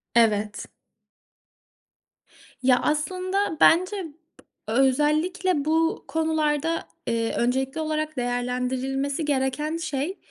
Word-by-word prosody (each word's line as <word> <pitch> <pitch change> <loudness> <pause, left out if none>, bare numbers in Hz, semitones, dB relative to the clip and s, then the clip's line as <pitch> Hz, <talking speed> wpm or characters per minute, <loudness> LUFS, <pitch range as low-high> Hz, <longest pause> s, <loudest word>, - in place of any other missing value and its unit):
Evet. 210 -3 +2 2.0
Ya, 250 -1 +5
aslında, 365 +4 -1
bence 370 +3 +4
b 315 - -10 0.6
özellikle 300 - +2
bu 325 +1 +1
konularda, 315 0 0 0.2
eee, 230 -1 0
öncelikli 265 +5 0
olarak 310 -1 -2
değerlendirilmesi 250 +4 -1
gereken 290 +3 -1
şey, 315 +3 -3
295 Hz, 80 wpm, -25 LUFS, 255-320 Hz, 2.0 s, Ya